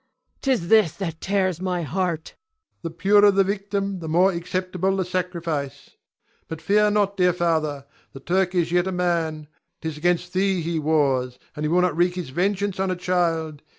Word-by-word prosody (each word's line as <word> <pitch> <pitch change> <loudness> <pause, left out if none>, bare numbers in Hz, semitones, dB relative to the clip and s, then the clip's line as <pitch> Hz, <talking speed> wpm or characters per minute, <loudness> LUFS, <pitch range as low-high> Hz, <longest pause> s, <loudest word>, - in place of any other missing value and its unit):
'Tis 245 -11 0
this 215 -8 +5
that 165 -5 -5
tears 185 -3 0
my 180 -2 -1
heart. 170 +1 -2
Ion. - - -33 0.4
The 165 - -4
purer 205 +5 +4
the 195 0 +4
victim 200 0 -2
the 165 - -7
more 180 +4 +4
acceptable 185 +2 -2
the 190 - 0
sacrifice. 170 -6 -4 0.6
But 160 - -6
fear 210 +5 +3
not, 205 -1 +1
dear 180 -1 +3
father. 155 -5 -1 0.3
The 135 - -9
Turk 185 +5 0
is 170 -1 +1
yet 175 +1 +2
a - - -1
man; 165 -4 -1 0.3
'tis 160 -2 -5
'gainst 175 +1 0
thee 190 -1 +1
he 165 0 -2
wars, 135 -5 +1 0.2
and 150 - -5
he 150 - 0
will 180 +2 +3
not 180 -4 +1
wreak 175 +1 +2
his 180 -6 -5
vengeance 195 +4 -1
on 190 0 0
a 185 - 0
child. 165 -4 -1
180 Hz, 185 wpm, -23 LUFS, 160-190 Hz, 0.6 s, this